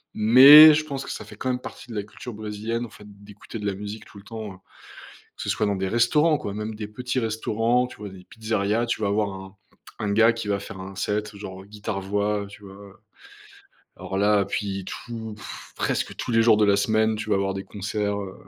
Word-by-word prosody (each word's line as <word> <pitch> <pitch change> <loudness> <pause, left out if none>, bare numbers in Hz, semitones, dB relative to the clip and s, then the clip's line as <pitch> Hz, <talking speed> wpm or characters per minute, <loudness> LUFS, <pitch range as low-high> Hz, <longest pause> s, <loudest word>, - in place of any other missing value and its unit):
Mais 140 +8 +10
je 155 +1 -1
pense 140 -2 -5
que - - -8
ça - - -7
fait - - -12
quand 130 - -3
même 125 0 -1
partie 125 - -10
de 115 - -7
la 105 - -2
culture 110 +3 -10
brésilienne, 110 +3 -4
en - - -11
fait, 105 - -14 0.2
d'écouter 105 +2 -10
de 105 - -6
la 100 - 0
musique 105 +2 -7
tout 100 - -14
le 100 - -16
temps, 110 -4 -7
heu. - - -15 0.8
Que - - -7
ce - - -2
soit 105 - 0
dans 100 -1 0
des 95 0 -2
restaurants 150 - +3
quoi, 100 - -5
même 105 +1 -5
des 105 -1 -6
petits 125 +4 -4
restaurants, 115 +2 0
tu - - -13
vois? 105 - -7
Des 95 -1 -13
pizzerias, 110 0 -1
tu 115 -2 -2
vas 100 - +1
avoir 100 0 0
un 95 +1 -10 0.4
un 105 - -2
gars 115 +2 +5
qui 115 -2 -6
va 100 - 0
faire 95 -1 -9
un 95 +1 -8
set, 105 0 -2
genre, 95 -2 -8
heu, - - -16
guitare 105 -1 -5
voix, 100 +1 -1
heu, - - -9
tu 100 +1 -14
vois, 95 - -11
heu? 100 -1 -14 1.0
Alors 95 - -5
là, 105 0 +3
puis 100 -1 -4
tout 110 0 -7
pff 110 - -10
presque - - -2
tous - - -5
les 115 -1 +4
jours 115 -2 +5
de 105 - +3
la 100 -1 +4
semaine, 110 +1 +1
tu 110 - -6
vas 105 - +4
avoir 95 0 -1
des 95 - -5
concerts, 105 0 -3
heu, 95 -1 -7
105 Hz, 245 wpm, -24 LUFS, 100-115 Hz, 1.0 s, Mais